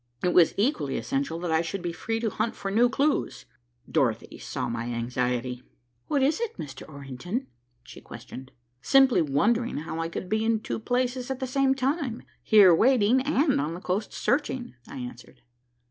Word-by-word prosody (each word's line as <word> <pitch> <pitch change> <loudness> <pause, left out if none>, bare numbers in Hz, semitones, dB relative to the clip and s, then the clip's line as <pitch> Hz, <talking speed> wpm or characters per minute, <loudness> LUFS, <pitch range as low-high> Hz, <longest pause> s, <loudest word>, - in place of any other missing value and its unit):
It 180 - +2
was 170 -3 +5
equally 195 - 0
essential 135 +7 -2
that 175 -2 -2
I 160 0 +3
should 175 +2 -4
be 175 -1 -2
free 225 +7 -3
to 225 -2 0
hunt 230 - -2
for 195 - -4
new 235 +4 +4
clues. 280 +3 0 0.4
Dorothy - - -1
saw - - -4
my 115 0 -3
anxiety. 125 +1 -2 0.5
"What 280 -2 +1
is 290 +8 +2
it, 465 -1 -3
Mr. 135 -1 -8
Orrington?" 140 - -5 0.4
she - - -12
questioned. 130 +1 -10 0.3
"Simply 265 - +5
wondering 215 - +1
how 160 +2 -5
I 165 0 -2
could 180 - -5
be 220 +3 0
in 225 -1 +1
two - - -4
places 250 +2 -1
at 265 -1 -3
the 260 - -2
same 270 +1 +2
time 270 -2 -1 0.2
here 200 -5 +7
waiting 245 +4 +4
and 280 - +2
on 155 +3 -3
the - - -7
coast 190 +3 -2
searching," 260 -2 -1
I - - -9
answered. 125 -1 -9
205 Hz, 175 wpm, -26 LUFS, -, 0.5 s, here